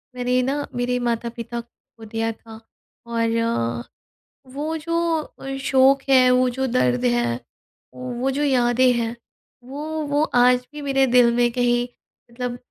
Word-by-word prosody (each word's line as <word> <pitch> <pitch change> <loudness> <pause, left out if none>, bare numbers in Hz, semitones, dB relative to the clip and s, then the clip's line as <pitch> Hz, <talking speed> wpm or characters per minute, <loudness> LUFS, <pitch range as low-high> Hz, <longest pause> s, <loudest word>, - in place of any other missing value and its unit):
मैंने 250 0 +1
ना 285 +3 -1
मेरे 245 0 0
माता-पिता 235 0 -3
को 230 -1 -18
दिया 225 +1 -2
था 225 0 -13 0.5
और 230 - -1 0.7
वो 305 +3 -3
जो 335 +2 -2 0.2
अ, 270 -2 -8
शोक 270 0 +4
है 255 -2 +6
वो 250 0 +3
जो 265 +2 -2
दर्द 125 - +1
है, 120 -1 +1 0.6
वो 255 +1 -3
जो 285 +2 -1
यादें 250 -2 +3
हैं 235 -1 -2 0.5
वो 275 +4 -7 0.2
वो 290 +1 +1
आज 250 0 +4
भी 300 - -7
मेरे 270 -1 +2
दिल 245 -1 +5
में 240 0 +2
कहीं 245 0 +1 0.4
मतलब 245 0 -4
245 Hz, 140 wpm, -22 LUFS, 230-265 Hz, 0.7 s, है